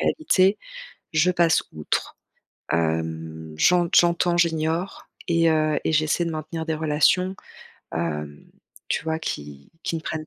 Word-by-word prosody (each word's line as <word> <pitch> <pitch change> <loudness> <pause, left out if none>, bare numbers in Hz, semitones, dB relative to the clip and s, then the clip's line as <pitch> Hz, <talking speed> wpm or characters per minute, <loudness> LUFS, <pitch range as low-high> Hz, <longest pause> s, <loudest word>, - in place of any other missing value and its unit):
réalité, 200 -10 +2 0.6
je 160 +3 +3
passe 170 -2 +3
outre, 75 -1 -3 0.6
hem, 80 -1 -2
j'ent 175 - +4
j'entends, 175 0 +4
j'ignore 165 +2 -1 0.2
et 165 -1 +3
heu, 155 -1 +2
et - - +1
j'essaie 155 +2 +2
de 165 - -3
maintenir 160 +1 -5
des 160 - -1
relations, 160 +5 +2 0.6
hem, 75 -3 -4 0.4
tu - - -1
vois? 160 0 -1
Qui 75 - -6
qui - - -2
ne - - -5
prennent 155 -1 -4
160 Hz, 135 wpm, -24 LUFS, -, 0.6 s, j'ent